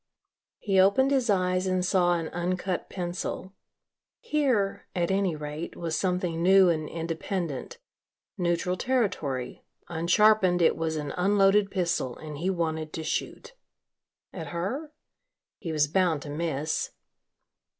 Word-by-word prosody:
He 195 -2 +1
opened 235 +9 +4
his 260 -4 +2
eyes 185 -1 +2
and 185 -1 +1
saw 180 -1 +3
an 165 -1 -3
uncut 180 +1 -2
pencil. 180 +1 -4 0.7
Here, 270 - 0
at 175 0 0
any 190 -3 +1
rate, 150 +2 -6
was 165 -2 -3
something 180 -3 -1
new 190 +1 +6
and 155 -2 -1
independent 165 -2 -4 0.6
neutral 175 0 0
territory, 175 - -1 0.3
unsharpened 180 +2 +4
it 170 - +4
was 160 -1 -2
an 150 -2 -3
unloaded 195 +1 +4
pistol 170 -9 -1
and 150 -2 -8
he 180 +4 0
wanted 160 -4 -2
to 160 - -4
shoot. 465 - -4 0.8
At 165 -4 -6
her? 205 - -4 0.7
He 170 - -4
was 150 -1 +2
bound 165 -2 +1
to 145 - -7
miss. 155 -1 -2
180 Hz, 130 wpm, -27 LUFS, 160-195 Hz, 0.8 s, new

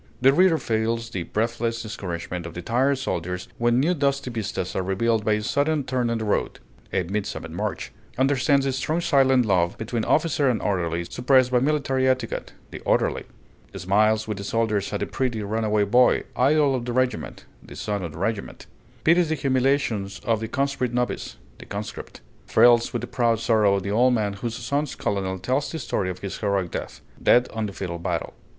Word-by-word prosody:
The 135 +1 +5
reader 180 +1 +5
feels 115 -1 -1
the 95 - -3
breathless 115 +4 -2
discouragement 90 -4 -5
of 85 - -10
the 90 - -6
tired 130 +7 +2
soldiers 90 -7 -3
when 120 +1 +3
new 160 +7 +2
dusty 140 -4 0
vistas 105 -5 -4
are - - +1
revealed 105 +4 0
by 110 - +2
a 105 0 -1
sudden 145 +5 +1
turn 125 -2 -1
in 115 - 0
the 110 - -3
road 105 - -1 0.3
('A 95 - +1
Midsummer 100 +4 -4
March'); - - -4 0.3
understands 135 +1 +2
the 135 - +1
strong 155 +5 -1
silent 135 -6 +3
love 90 -4 +1
between 110 0 -3
officer 150 -2 +2
and 115 -4 +1
orderly, 85 -4 -1
suppressed 125 +6 +2
by 125 - +4
military 135 -1 +1
etiquette 130 -3 -2 0.2
('The - - -7
Orderly'); - - 0 0.5
smiles 110 +4 +2
with 105 -3 -4
the - - -5
soldiers 105 -1 0
at 100 - -3
the - - +1
pretty 120 -5 -2
runaway 105 0 +1
boy, 120 +5 +4
idol 145 +2 +3
of 125 -2 -2
the 120 - -3
regiment 130 0 -1 0.2
('The - - -12
Son 105 -2 -3
of 85 - -5
the - - -10
Regiment'); 100 +3 -3 0.4
pities 170 0 +4
the 160 - +1
humiliations 130 -7 0
of 115 -2 +1
the 110 - -4
conscript 130 -1 -1
novice 125 0 -2 0.2
('The - - -11
Conscript'); 105 +1 -7 0.3
thrills 120 +1 +5
with 120 - -2
the - - -4
proud 115 -3 +1
sorrow 110 -3 +3
of 100 - -2
the 100 - -3
old 125 +4 +4
man 105 -3 0
whose 115 +3 -4
son's 140 +4 -2
colonel 95 -2 -2
tells 130 +10 -1
the 165 - -4
story 105 -9 -2
of 90 0 -6
his 100 - -5
heroic 100 -4 0
death - - -6 0.2
('Dead 125 +1 +5
on 110 -1 -2
the - - -6
Field 95 -3 -5
of 85 0 -6
Battle'). - - -2
115 Hz, 195 wpm, -24 LUFS, 100-130 Hz, 0.5 s, The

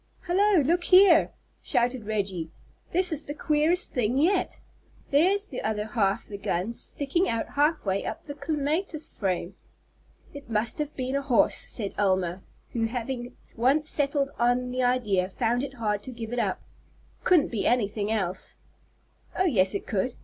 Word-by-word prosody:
"Hallo, 375 0 +3
look 345 +5 +1
here!" 370 -3 +6 0.3
shouted 240 -2 0
Reggie. 195 -6 -2 0.4
"This 365 +1 +3
is 310 -1 -3
the 290 - -6
queerest 310 +4 +1
thing 245 0 0
yet. 360 +6 +1 0.5
There's 380 +8 +4
the 255 - -4
other 215 -1 -2
half 210 -3 0
the 200 -1 -8
gun 190 +4 -2
sticking 290 +9 -1
out 230 -1 -2
half 300 0 +1
way 195 0 0
up - - -5
the 290 - -6
clematis 310 +3 -2
frame!" 185 -2 -2 0.8
"It 285 -4 -10
must 225 +3 -1
have 300 0 -3
been 260 +1 -2
a 280 - +1
horse," 265 -4 +3
said 200 -4 -4
Elma, 185 -2 +1 0.3
who 230 -2 0
having 245 +1 -4 0.2
once 275 +6 +2
settled 280 -1 +1
on 245 +1 +1
the 255 +1 -1
idea 215 -7 +1
found 235 +4 0
it 275 0 -6
hard 210 -4 -1
to 255 - -8
give 230 -1 -7
it 245 - -1
up. - - -1 0.6
"It - - -33
couldn't 345 -6 +4
be 220 -4 -1
anything 210 -3 0
else." 190 -4 -3 0.8
"Oh, 375 - +2
yes, 200 - +3
it 200 - -3
could. 225 +4 -1
250 Hz, 165 wpm, -27 LUFS, 210-300 Hz, 0.8 s, here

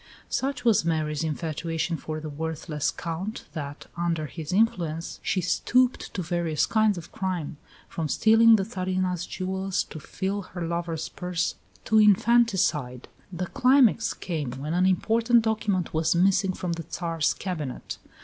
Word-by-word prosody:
Such 270 -1 -2
was 225 -7 +4
Mary's 155 -2 -1
infatuation 165 +1 -2
for 155 -1 -5
the 155 - -6
worthless 155 0 -3
Count 175 +6 -5
that, 145 -2 -6
under 170 -2 -1
his 155 +1 -7
influence, 175 -6 0
she 190 - 0
stooped 250 +8 +1
to 185 - -2
various 170 -2 0
kinds 215 -3 +2
of 170 - -9
crime, 180 -5 -3 0.3
from 160 -2 -3
stealing 225 +6 +6
the 200 - +1
Tsarina's 185 -3 -2
jewels 190 0 -2
to 155 - -9
fill 195 +6 -3
her 180 -2 -6
lover's 170 -1 -3
purse, 180 -2 -2 0.3
to 220 - +4
infanticide. 195 - +3 0.2
The 180 0 -3
climax 250 +1 +3
came 150 -8 -4
when 145 +5 -4
an 180 +2 +3
important 230 +5 +3
document 210 -5 0
was 160 +1 +2
missing 190 +1 +3
from 180 -1 -4
the 165 0 -5
Tsar's 165 -2 0
cabinet. 155 -9 -5
175 Hz, 145 wpm, -26 LUFS, 160-200 Hz, 0.3 s, stealing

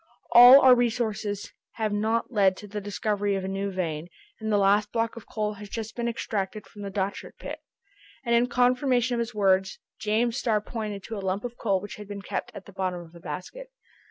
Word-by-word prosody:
All 245 +3 +10
our 260 -1 +8
researches 225 -4 -1 0.2
have 215 -2 -2
not 220 +4 0
led 195 -4 +3
to 210 - -10
the 210 +1 -5
discovery 205 0 -1
of 190 - -3
a - - -3
new 195 +1 -2
vein, 170 -4 -3 0.3
and 220 -1 -3
the 205 - +4
last 205 +1 +3
block 230 -1 -1
of 235 - -11
coal 215 -1 -2
has 205 0 -10
just 225 +1 -5
been 235 -1 -2
extracted 215 -3 -3
from 205 - -13
the 200 - -4
Dochart 195 0 -4
pit." - - -7 0.7
And 235 - +1
in 235 +1 +4
confirmation 250 0 +2
of 235 - 0
his 235 -1 -3
words, 190 -2 +2 0.2
James 225 +3 +1
Starr 220 -5 +1
pointed 210 -2 -5
to 225 - -6
a - - -3
lump 190 +1 -2
of 240 0 -5
coal 200 -5 0
which 205 - -8
had 210 -1 -9
been 200 -1 -7
kept - - -4
at 195 - -9
the 200 - -14
bottom 185 -2 -2
of 170 -1 -13
a 170 - -12
basket. 185 - -7
210 Hz, 215 wpm, -26 LUFS, 195-235 Hz, 0.7 s, All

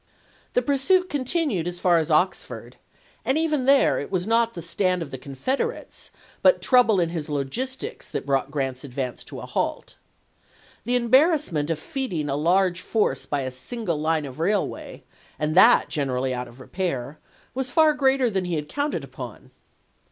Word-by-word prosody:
The - - +3
pursuit 360 +7 +2
continued 270 - 0
as 175 0 -4
far 175 -2 +4
as 160 - -2
Oxford, 165 +5 0 0.5
and 265 - +1
even 305 -5 0
there 275 0 +4
it 145 - -5
was 185 -2 -1
not 230 +1 +2
the 170 - -5
stand 180 +1 0
of 140 - -10
the 130 - -5
Confederates 260 - -3 0.3
but - - +5
trouble 240 -6 +4
in 170 -2 +1
his 160 -3 -4
logistics 255 - -4
that - - -4
brought 135 -1 0
Grant's 135 -3 -3
advance 130 -2 -5
to - - -8
a - - -7
halt. - - -3 0.9
The 245 +2 +1
embarrass 270 - +4
ment 150 -1 -1
of 165 - 0
feeding 170 - -3
a 135 - 0
large 180 +4 +2
force 220 +2 0
by 145 -1 -1
a 130 -1 -3
single 175 - -3
line 160 -1 +1
of 135 +2 -9
railway, 195 +4 -2 0.3
and 155 0 -1
that 225 +8 +6
generally 130 -3 -1
out 125 0 -4
of 120 +2 -15
repair, 145 -3 -4 0.3
was 260 0 -2
far 315 +2 +4
greater 270 -3 +2
than 195 -5 -1
he 175 -1 -2
had 150 -1 -3
counted 285 - -2
upon. 130 -4 -9
180 Hz, 175 wpm, -24 LUFS, -, 0.9 s, that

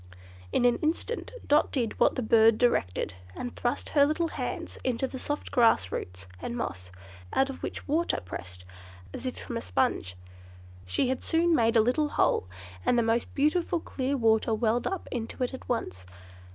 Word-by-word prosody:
In 245 - +2
an 240 -1 +4
instant 330 +9 -2
Dot 295 +1 +3
did 235 -6 -2
what - - +4
the 255 - -1
bird 220 0 +5
directed, 155 - +1 0.2
and 245 - -5
thrust 240 - -2
her 285 - +5
little 310 +3 +1
hands - - -5
into 255 0 0
the 260 0 -6
soft 290 +3 -3
grass 225 - +4
roots 90 +1 -5 0.2
and 240 - -4
moss, 90 - -4 0.4
out 270 +1 +2
of 265 - -10
which - - -5
water 325 +4 +1
pressed, 90 0 -9 0.5
as - - -5
if 255 - -4
from 235 - -5
a - - -3
sponge. 165 - 0 0.7
She 250 - +1
had 260 - -2
soon 335 +1 +2
made 230 -5 +3
a - - +7
little 275 +7 +1
hole, 95 - +2 0.4
and 245 - +3
the 235 - +4
most 225 +1 0
beautiful 335 +4 +2
clear 275 -2 -2
water 225 -1 +3
welled 230 +1 +1
up 385 -2 -4
into 240 +1 -3
it 250 - -2
at 260 - -9
once. 90 - -3
245 Hz, 180 wpm, -28 LUFS, 220-280 Hz, 0.7 s, a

